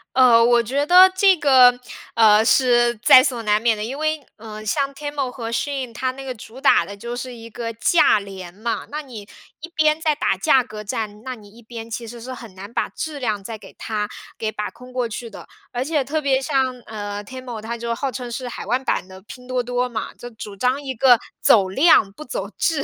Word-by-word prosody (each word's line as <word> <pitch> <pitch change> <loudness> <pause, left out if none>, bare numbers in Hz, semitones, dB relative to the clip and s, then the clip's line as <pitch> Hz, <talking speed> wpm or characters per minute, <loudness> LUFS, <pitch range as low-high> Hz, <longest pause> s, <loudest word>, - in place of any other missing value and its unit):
呃， 245 -3 +6
我 240 0 +4
觉 275 +6 -1
得 370 +3 +8
这 380 0 +5
个， 255 -4 +6 0.3
呃， 220 -1 +5
是 240 0 +4
在 255 +3 +7
所 245 -5 -1
难 210 -1 +2
免 230 -1 +2
的， 210 - -5
因 255 +6 -5
为， 310 -1 -1
呃， 215 -1 -9
像 275 +6 -1
TEMU 290 -2 -4
和 230 -3 -6
SHEIN 265 0 -2
它 255 +3 -2
那 270 +1 -10
个 255 -2 -5
主 230 +4 -12
打 225 -10 +4
的 200 - -9
就 235 +4 -6
是 250 +1 -6
一 230 -1 -11
个 230 0 -5
价 230 0 +4
廉 190 -3 -9
嘛。 225 +4 -3
那 300 +1 -3
你 250 -7 -10 0.4
一 335 - -9
边 310 0 +3
在 315 -1 +1
打 240 -9 0
价 255 +6 +3
格 215 -3 -9
战， 210 +1 -5
那 260 - -5
你 210 -4 -14
一 235 +3 -17
边 230 0 -9
其 230 +1 -5
实 235 +1 -9
是 255 - -7
很 235 -5 -10
难 195 +4 -10
把 - - -1
质 305 -2 -6
量 215 -6 -2
再 220 +2 -6
给 - - -15
它 210 -2 -3 0.3
给 220 -1 -2
把 210 -1 -4
控 250 +1 -15
过 245 -2 -1
去 230 +1 -7
的。 - - -11 0.2
而 245 0 -2
且， 295 0 0
特 305 +3 -2
别 270 -2 +2
像， 270 -1 +1 0.2
呃 205 -1 -6
，TEMU 255 -1 -7
它 225 +2 -5
就 235 0 -3
号 270 +2 -3
称 245 -2 -6
是 250 +1 -5
海 240 - -7
外 240 +4 +2
版 260 -7 -2
的 190 0 -12
拼 250 +4 -12
多 255 -1 -1
多 245 +1 -1
嘛， 225 -2 -5
就 245 - -10
主 215 -3 -9
张 250 +7 0
一 265 -1 -4
个 245 0 +5 0.2
走 195 -4 +5
量 215 - +4
不 305 - -10
走 - - -5
质。 310 -4 0
240 Hz, 270 characters per minute, -21 LUFS, 220-265 Hz, 0.4 s, 得